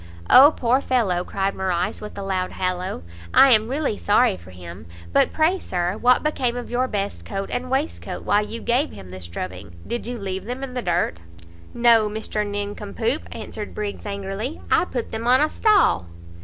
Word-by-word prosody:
"O 280 +4 +9
poor 250 +2 +2
fellow!" 205 -11 +1
cried 195 +1 -2
Morrice 180 -2 -2
with 210 -1 -8
a 200 - -4
loud 185 -1 -2
hallow, 185 - -3 0.3
"I 270 - +8
am 220 -2 +5
really 270 -4 -1
sorry 210 +1 +3
for 95 - -14
him. 85 -3 -10 0.3
But - - +4
pray, 330 +4 +2
Sir, 180 - -2
what 245 +3 +3
became 255 -5 0
of 245 - -6
your 250 +1 +1
best 200 -3 -3
coat 195 -1 -5
and 250 +1 -3
waistcoat 270 +4 -2
while 205 +1 +2
you 225 +2 -6
gave 250 +6 +1
him 90 -2 -11
this 95 -2 -8
drubbing? 90 0 -7
did 235 -1 -4
you 245 0 -4
leave 190 -2 -5
them 250 +4 -5
in 265 -2 -6
the 250 - -2
dirt?" 175 - 0 0.6
"No, 230 -3 +5
Mr 215 0 -3
Nincompoop," 205 +5 -3
answered 210 -1 -7
Briggs 210 0 -5
angrily, 200 +7 -4
"I - - +4
put 245 -8 -4
them 225 +1 -4
on 255 +1 +6
a 305 +1 +2
stall." 405 - +3
210 Hz, 185 wpm, -23 LUFS, 190-250 Hz, 0.6 s, O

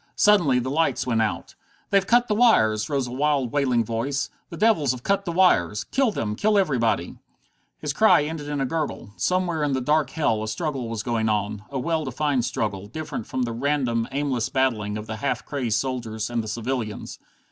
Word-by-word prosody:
Suddenly 175 -11 +4
the 125 +1 -1
lights 160 +3 +1
went 115 -3 +1
out. 110 -2 -2 0.4
"They've 195 -1 +3
cut 240 +1 +4
the 210 - +1
wires!" 110 - +3
rose 140 -2 0
a 120 - -7
wild, 140 -2 0
wailing 130 -5 +1
voice. 120 +5 -2 0.2
"The 170 - -8
devils 180 - +3
have 125 -1 -9
cut 200 0 +1
the 175 - -2
wires! 105 - +3
Kill 270 -2 +1
them! 110 - -2
Kill 210 - +2
everybody!" 130 - 0 0.6
His - - -3
cry 150 - +5
ended 150 -1 -5
in 145 -1 -2
a 135 - +1
gurgle. 150 -7 -3
Somewhere 180 -4 0
in 145 -2 0
that 130 -1 -2
dark 150 +1 +2
hell 115 -9 0
a 110 - -3
struggle 125 +2 -3
was 115 -2 -3
going 115 -2 0
on, 105 0 -2
a 140 - -4
well 160 +4 -1
defined 135 -1 0
struggle, 100 -4 -3
different 150 -2 -6
from 130 -1 -2
the 120 - -2
random, 125 -3 0
aimless 135 -4 -1
battling 110 -6 0
of 105 - -6
the 110 0 -5
half 140 - -2
crazed 125 -7 -1
soldiers 115 -3 -3
and 120 -1 -1
the - - -7
civilians. 115 0 -4
130 Hz, 200 wpm, -24 LUFS, 115-155 Hz, 0.6 s, cry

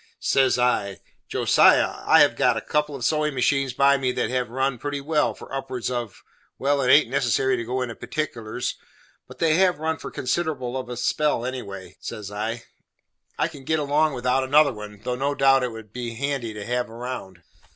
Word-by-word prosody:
Says 135 -2 +2
I, 125 -5 0 0.3
"Josiah, - - +4
I - - +7
have - - +4
got - - +2
a - - -2
couple 150 -1 -1
of 125 -4 -4
sewin' 150 0 +1
machines 135 0 +1
by 140 +2 +4
me 130 -2 0
that - - -1
have 125 -2 -1
run 130 0 -1
pretty 145 +2 -3
well 150 +2 0
for - - -12
upwards 130 -2 -3
of 120 -4 -5 0.3
well 140 +1 +1
it 125 - +1
haint 150 - +6
necessary 130 0 +1
to 115 - -3
go 125 +2 -2
into 120 -2 -5
particulars, 120 -6 -4 0.5
but - - -13
they 165 -2 +2
have 185 -1 +3
run 160 +1 -2
for - - -7
considerable 130 -3 -2
of 130 -1 -4
a 125 - -5
spell 125 +1 0
anyway" 100 -8 -7
says 105 -2 -7
I, 110 +3 -4 0.7
"I - - +1
can 145 -5 -12
git 160 +4 0
along 150 0 +1
without 125 +2 +1
another 145 +1 +4
one, 105 -1 -10
though 125 - -2
no 140 +3 -1
doubt 135 -1 +4
it 125 -1 -2
would 110 -2 -11
be 120 -2 -5
handy 135 -2 -2
to 105 -1 -6
have 125 0 -1
round." 115 -7 -7
130 Hz, 195 wpm, -24 LUFS, 120-140 Hz, 0.7 s, I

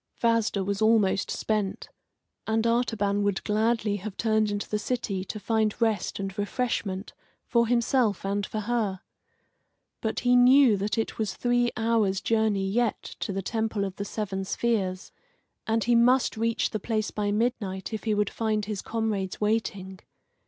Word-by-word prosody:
Vasda 230 -4 +2
was 200 +1 -2
almost 215 -3 +3
spent, 210 -3 -2 0.6
and 220 +1 +1
Artaban 225 -4 +1
would 200 -1 0
gladly 215 -1 +1
have 205 0 -7
turned 220 -1 +2
into 205 0 -3
the 210 - -1
city 210 -5 -2
to 215 - -6
find 220 0 0
rest 220 -5 0
and 195 -1 -4
refreshment 205 -3 -2 0.3
for 235 -2 +2
himself 235 -4 +1
and 200 +1 -1
for 215 +2 -3
her. 210 -4 -1 1.0
But 220 - -2
he 245 0 +4
knew 250 -1 +6
that 200 +3 -2
it 225 - -2
was 210 -5 -1
three 245 0 +1
hours' 220 -4 +1
journey 215 -2 +1
yet 235 +4 0 0.2
to - - -3
the 195 0 -3
Temple 220 -1 -1
of 190 -1 -6
the 200 - -3
Seven 195 -2 -3
Spheres, 190 -3 -1 0.6
and 225 0 +1
he 240 - +2
must 245 +2 +4
reach 230 +1 0
the 215 - -2
place 215 0 -2
by 205 -1 -1
midnight 210 -3 -2
if 220 - -4
he 215 -2 +1
would 205 -1 0
find 215 -2 -1
his 205 -2 -4
comrades 215 -4 -2
waiting. 200 -3 -1
215 Hz, 160 wpm, -27 LUFS, 200-230 Hz, 1.0 s, knew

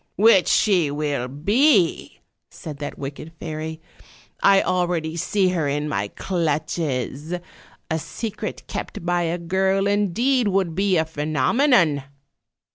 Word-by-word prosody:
" - - -48
'Which 205 -3 +5
she 185 -8 +3
will 145 -3 -2
be,' 200 - +2 0.3
said 150 -3 -9
that 145 - -6
wicked 145 +3 -7
fairy, 160 0 -5 0.6
'I 195 -1 +6
al 180 -1 +1
ready 165 -2 -2
see 185 +3 +1
her 170 -5 0
in 145 +1 -1
my 100 -8 -1
clutches; 155 - -2 0.6
a 160 - +1
secret 220 +6 -5
kept - - -6
by 175 0 +1
a 170 0 -1
girl, 190 +3 +1
indeed, 210 +5 +1
would 190 -4 +1
be 190 +1 +2
a 160 - +2
phenomenon!' 155 - +2
170 Hz, 130 wpm, -22 LUFS, 150-195 Hz, 0.6 s, I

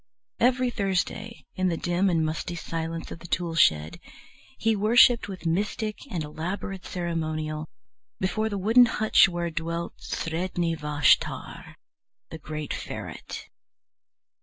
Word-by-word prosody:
Every 250 +1 +3
Thursday, 205 +2 -2
in 185 -1 0
the 170 -2 0
dim 175 +4 +1
and 165 -3 +2
musty 155 +2 -3
silence 165 0 -4
of - - -7
the 170 - -10
tool 170 -1 -1
shed, 80 - +3 0.6
he 225 0 +2
worshipped 235 +3 +5
with 190 -3 -8
mystic 210 +5 -1
and 170 -4 -2
elaborate 180 +5 -5
ceremonial 155 -3 -3 0.5
before 215 +4 0
the 205 - -3
wooden 225 +6 +6
hutch 220 -3 +4
where 175 -1 -2
dwelt 170 +1 -3
Sredni 170 0 -2
Vashtar, 150 -2 +1 0.6
the 160 - -7
great 150 -1 -5
ferret. - - -7
175 Hz, 125 wpm, -26 LUFS, 160-205 Hz, 0.6 s, wooden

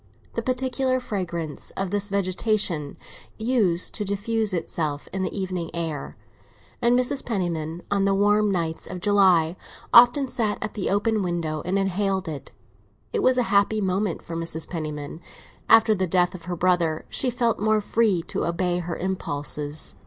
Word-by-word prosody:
The 230 - -2
peculiar 255 +1 0
fragrance 170 - -4
of 195 -1 -2
this 205 0 +1
vegetation 190 -5 0 0.4
used 220 -7 +1
to 210 - -3
diffuse 210 +2 -1
itself 155 -4 -2
in 190 - -2
the 190 +2 -2
evening 185 -3 -3
air, 160 -4 -4 0.6
and 240 +1 +4
Mrs. 255 +2 +1
Penniman, 175 -6 -3
on 200 -1 +2
the 195 0 +2
warm 205 +1 +3
nights 165 -3 -2
of 180 - -6
July, 185 -4 +4 0.4
often 245 +3 +7
sat 220 -4 -1
at - - -4
the 205 - -2
open 210 +2 +1
window 170 -4 -2
and 185 +3 0
inhaled 195 -1 0
it. 150 -3 -6 0.6
This 450 - 0
was 255 -6 +4
a 250 - +3
happy 200 +2 +3
moment 190 -1 -1
for 165 - -6
Mrs. 165 -1 -2
Penniman; 155 -2 -5 0.5
after 225 -1 +7
the 190 -2 0
death 175 0 +2
of 170 -3 -10
her 180 0 -3
brother 170 -3 +1
she 260 - 0
felt 235 -1 0
more 215 0 +2
free 210 -4 +1
to - - -3
obey 175 +1 0
her 170 -1 -4
impulses. 150 -5 -2
190 Hz, 160 wpm, -24 LUFS, 170-215 Hz, 0.6 s, often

